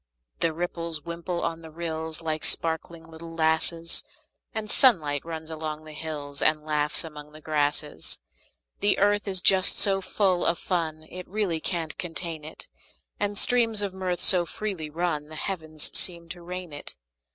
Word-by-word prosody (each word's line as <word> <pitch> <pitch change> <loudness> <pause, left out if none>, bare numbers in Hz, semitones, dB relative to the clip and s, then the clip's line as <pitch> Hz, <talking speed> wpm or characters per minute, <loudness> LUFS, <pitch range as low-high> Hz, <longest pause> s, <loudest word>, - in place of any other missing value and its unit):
The 165 - +2
ripples 165 -2 -3
wimple 170 +1 -3
on 165 0 -2
the 160 - -10
rills, 160 0 -4
Like 155 -1 -2
sparkling 165 0 -1
little 165 +1 -9
lasses; 165 +1 +1 0.5
The 220 -2 -3
sunlight 160 - +5
runs 160 -1 -6
along 155 -1 -4
the 155 - -9
hills, 150 -2 -5
And 155 0 +4
laughs 150 -1 +1
among 150 -2 -10
the 155 - -10
grasses. 150 - -1 0.6
The 205 - +4
earth 205 +1 +3
is 190 -2 -1
just 190 -1 +6
so 195 -2 +4
full 185 -2 +1
of 170 - +3
fun 160 -4 -2
It 180 0 -7
really 195 -5 0
can't 165 -2 -2
contain 165 -2 -3
it; 160 - -9 0.5
And 205 0 0
streams 225 -3 +4
of 195 -2 -2
mirth 185 -2 -2
so 180 -2 +7
freely 175 -3 -4
run 155 -2 -2
The 155 - -8
heavens 155 -3 -4
seem 170 -2 -1
to 175 +1 -6
rain 180 -2 -6
it. 145 - -7
165 Hz, 165 wpm, -27 LUFS, 155-180 Hz, 0.6 s, so